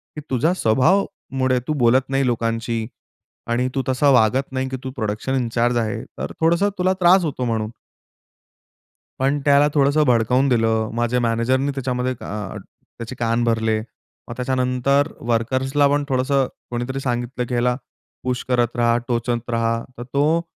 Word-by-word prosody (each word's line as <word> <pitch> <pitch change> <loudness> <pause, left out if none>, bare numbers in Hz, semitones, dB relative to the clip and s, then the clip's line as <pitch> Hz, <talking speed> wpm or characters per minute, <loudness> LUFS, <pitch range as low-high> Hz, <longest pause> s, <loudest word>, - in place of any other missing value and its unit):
की 150 - -5
तुझ्या 135 +7 +2
स्वभावामुळे 130 - +1
तू 155 - 0
बोलत 125 +2 +3
नाही 135 0 +1
लोकांशी 115 -1 -1 0.6
आणि 125 +2 +1
तू 135 - +1
तसा 135 +2 +3
वागत 125 +3 +3
नाही 130 0 -2
की 130 - -4
तू 130 - -4
प्रोडक्शन 110 +3 -2
इन 125 -3 0
चार्ज 120 +1 +2
आहे, 110 -2 -2
तर - - -7
थोडंसं 170 +5 +3
तुला 185 +1 +3
त्रास 180 +1 +6
होतो 140 -4 -3
म्हणून. 110 -2 -1 1.5
पण 135 +2 +1
त्याला 145 0 +5
थोडंसं 145 +1 +3
भडकावून 125 +3 +3
दिलं. 110 -2 +1
माझ्या 120 +1 0
मॅनेजरने 125 +4 +1
त्याच्यामध्ये 130 -1 -2
अ, 105 -2 -5 0.4
त्याचे 115 +2 -7
कान 115 0 +1
भरले. 110 -1 +1 0.5
मग 120 - -6
त्याच्यानंतर 130 +3 +1 0.2
वर्कर्सला 130 +5 +1
पण 145 +1 +1
थोडंसं 130 0 +1 0.2
कोणीतरी 120 +3 -3
सांगितलं, 120 -1 -2
की 125 - -6
ह्याला 120 +1 +2 0.5
पुश 125 -1 -2
करत 120 -2 +1
राहा, 120 0 +3
टोचत 120 -1 -2
राहा. 115 0 0
तर 120 - -6
तो 150 +4 +2
125 Hz, 150 wpm, -21 LUFS, 115-135 Hz, 1.5 s, त्रास